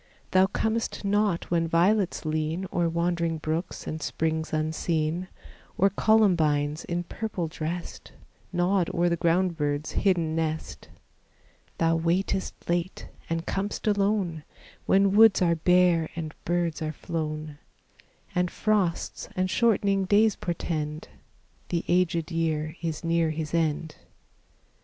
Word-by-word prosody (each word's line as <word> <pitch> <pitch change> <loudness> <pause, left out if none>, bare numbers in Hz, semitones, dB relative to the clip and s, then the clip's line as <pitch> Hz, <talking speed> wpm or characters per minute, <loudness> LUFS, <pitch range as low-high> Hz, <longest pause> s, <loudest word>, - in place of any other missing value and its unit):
Thou 185 0 +5
comest 220 +1 -2
not 205 -4 +1
when 165 -1 +2
violets 180 +2 +2
lean 155 +4 -1
O'er 170 -1 +1
wandering 170 -1 0
brooks 155 +3 -3
and 155 0 -5
springs 160 +2 -2
unseen, 160 +2 -1 0.5
Or 195 +1 +4
columbines 160 -9 +2
in 175 0 -2
purple 190 -2 -4
dressed, 165 +2 -6 0.4
Nod 180 0 +1
o'er 175 +1 +3
the 170 - +1
ground 170 +1 +1
bird's 145 0 -1
hidden 170 -5 +1
nest. 160 -1 -3 0.9
Thou 165 0 +2
waitest 175 +3 0
late, 175 +2 -2 0.2
and 165 0 -2
com'st 200 +2 -3
alone, 200 -6 +1 0.4
When 195 0 +4
woods 220 -1 +7
are 170 -2 +3
bare 175 -1 +3
and 155 -2 -5
birds 170 -2 0
are 155 0 -2
flown, 155 -2 -4 0.7
And 180 0 +1
frosts 200 -5 -1
and 185 0 0
shortening 200 -4 +2
days 210 +2 +4
portend 155 -3 -3 0.6
The 170 -1 -1
aged 175 -2 +1
year 160 -1 -1
is 165 -2 -3
near 165 -1 +2
his 155 -1 -4
end. 160 -1 -1
170 Hz, 125 wpm, -27 LUFS, 160-185 Hz, 0.9 s, woods